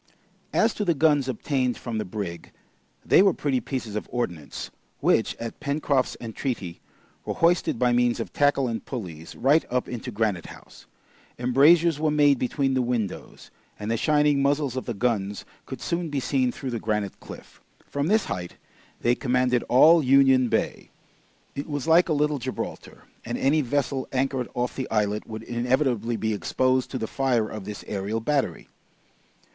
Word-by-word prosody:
As 225 0 +2
to 210 - -2
the 170 -4 +1
guns 145 -2 +3
obtained 130 0 -1
from 115 -3 -4
the 105 - -2
brig, 90 -3 -6 0.5
they - - +6
were 195 -3 +4
pretty 135 -3 0
pieces 125 -6 -5
of 105 - -4
ordnance, 90 -12 -4 0.3
which, - - +2
at 115 -1 -7
Pencroft's 140 -3 0
entreaty, 115 -6 -4 0.4
were - - -4
hoisted 170 -6 +2
by 125 0 +2
means 120 0 +2
of - - -5
tackle 145 -2 +2
and 115 -1 -3
pulleys, 85 - -7
right 145 +5 +3
up 125 0 -1
into 125 +1 -6
Granite 105 -6 -1
House; - - -14 0.5
embrasures 145 +6 +4
were 155 0 +1
made 145 -3 +4
between 135 +1 0
the 130 - +2
windows, 120 -5 -4 0.3
and 105 +2 -4
the - - +2
shining 150 +2 +2
muzzles 140 -2 +1
of 130 - -3
the 120 - -3
guns 105 -3 -1 0.2
could - - -7
soon 170 -1 -2
be 145 -2 -1
seen 130 -1 +1
through 130 0 -6
the 115 - -2
granite 105 -3 -2
cliff. - - -12 0.2
From 145 +1 -2
this 215 +3 +3
height 90 -1 -5 0.5
they 120 - +3
commanded 125 -1 +1
all 160 +7 +7
Union 135 -2 +5
Bay. - - -1 0.6
It 140 +3 -6
was 145 0 -3
like 170 +2 +5
a - - +3
little 150 -1 +1
Gibraltar, 130 +1 -6 0.2
and - - -4
any 150 +3 +2
vessel 135 0 -1
anchored 130 -1 -1
off 125 0 -2
the 130 - -4
islet 105 -1 0
would 110 0 -7
inevitably 120 -1 0
be 110 -1 -1
exposed 130 +4 0
to 130 - -4
the 110 - -2
fire 125 -3 0
of 105 -3 -7
this 105 0 -7
aerial 105 +2 -2
battery. 130 - -1
125 Hz, 170 wpm, -25 LUFS, 115-145 Hz, 0.6 s, all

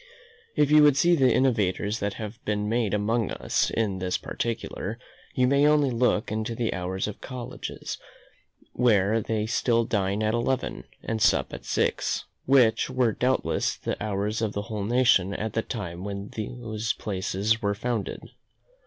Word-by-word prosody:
If 145 0 +3
you 150 0 +8
would 145 -2 +6
see 175 +4 +4
the 130 -5 +4
innovations 105 -4 +1
that 100 -1 -2
have 110 +3 -7
been 105 0 -1
made 115 -2 0
among 110 +1 0
us - - 0
in 100 -4 -1
this 90 0 -1
particular, 115 -2 -4 0.4
you 125 - +3
may 140 +3 +4
only 150 -3 +4
look 115 -3 +1
into 110 +2 -2
the 115 -1 -1
hours 95 +2 -2
of 105 - -7
colleges, 125 -2 -6 0.7
where 110 -2 +3
they 110 0 -1
still 115 0 +1
dine 100 0 0
at 110 0 +1
eleven, 125 +2 -1 0.2
and 110 -1 -2
sup - - +3
at - - -8
six, - - 0 0.2
which 125 -4 +4
were 130 -3 +2
doubtless 125 +4 0
the - - -4
hours 105 +1 -1
of 110 -2 -1
the 100 - -3
whole 105 -3 -4
nation 110 -5 +3
at 110 0 -3
the 115 - +1
time 90 -7 -5
when 100 0 -5
those 110 -1 -3
places 100 +2 -1
were 100 0 0
founded. 115 -1 -3
110 Hz, 160 wpm, -26 LUFS, 100-125 Hz, 0.7 s, you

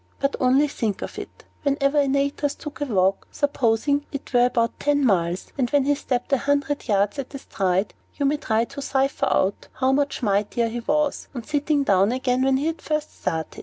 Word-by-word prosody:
But 275 0 0
only 265 +3 +4
think 220 -7 -3
of - - -6
it! - - -10 0.2
Whenever 280 0 +2
Antaeus 280 +1 0
took 300 -1 -9
a - - +1
walk, 195 -5 +1
supposing 285 0 +1
it 280 -1 -7
were 245 0 +5
but 230 -1 0
ten 285 -1 +2
miles, 180 -4 0
and 245 -2 +1
that 285 +1 +3
he 290 +2 +2
stepped 255 -2 -2
a 270 - +4
hundred 285 0 -1
yards 205 +4 +1
at 275 +1 -6
a - - -2
stride, 190 -5 -1 0.2
you 285 - -1
may 290 +2 +2
try 225 -5 0
to 280 - -8
cipher 270 0 0
out 190 +1 0
how 260 0 +1
much 280 -1 0
mightier 210 +3 +1
he 240 +2 -4
was, 295 +4 0
on 240 - -4
sitting 295 +1 0
down 195 -3 +3
again, 255 0 0
than 265 0 +3
when - - +3
he 310 +4 0
first 305 -1 -4
started. 160 -1 -3
270 Hz, 205 wpm, -23 LUFS, 225-285 Hz, 0.2 s, were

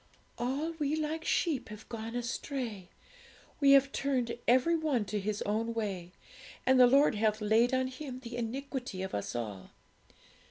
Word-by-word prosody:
'"All 270 +7 -1
we 295 0 +1
like 315 +1 -2
sheep 285 -10 0
have 215 0 -10
gone 230 0 -6
astray; 235 -5 -4 0.7
we 280 -2 +6
have 275 0 +5
turned 255 -4 -1
every 260 +8 +4
one 295 -9 0
to 210 +1 -2
his 210 +1 -2
own 225 +3 -1
way; 190 -6 -3 0.5
and 260 0 +5
the 250 - +9
Lord 275 +3 +5
hath 215 0 +1
laid 220 +3 +3
on 260 0 +2
Him 260 0 -7
the 240 -1 -7
iniquity 245 -3 -4
of 190 - -5
us 100 +1 -3
all." 105 -5 -5
245 Hz, 160 wpm, -31 LUFS, 215-275 Hz, 0.7 s, the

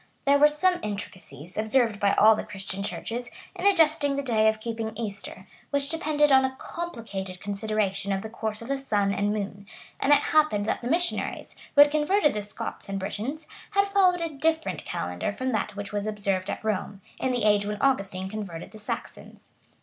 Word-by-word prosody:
There 285 0 +5
were 295 - +8
some 355 +5 +1
intricacies, 185 -6 -7
observed 220 -1 +2
by 200 -1 +3
all 220 +1 +7
the - - -3
Christian 195 -2 -6
churches, 235 +4 -4 0.3
in - - +1
adjusting 315 -6 +4
the 280 - -2
day 220 -4 +3
of 220 0 -2
keeping 225 -1 -4
Easter; 210 -3 -6 0.2
which 280 -1 -1
depended 300 -2 +2
on 265 0 +7
a 265 0 -1
complicated 220 - -6
consideration 200 -1 -1
of 195 0 -1
the - - -4
course 220 -1 -4
of - - -9
the 275 0 -1
sun 205 -7 +1
and 205 +1 0
moon; 200 -1 -4 0.3
and 280 - +2
it 290 - +8
happened 300 -10 +3
that - - -1
the 240 - -4
missionaries, 345 +3 -1 0.2
who 285 - +9
had 290 0 +7
converted 305 +2 +3
the 210 - -2
Scots 205 -1 -6
and 195 - -2
Britons, 235 +11 -4 0.2
had 400 -1 +2
followed 370 -3 +4
a 335 - -1
different 280 - -1
calendar 90 - -3
from 255 +5 -2
that 210 -2 -2
which 205 +1 -6
was 205 0 -2
observed 200 -3 -1
at - - -4
Rome, 205 -2 -2 0.2
in 260 - 0
the 245 -3 0
age 205 -1 +3
when 210 0 -3
Augustine 195 -8 +1
converted 195 -5 -6
the 215 - -11
Saxons. 210 - -7
220 Hz, 195 wpm, -26 LUFS, 200-285 Hz, 0.3 s, who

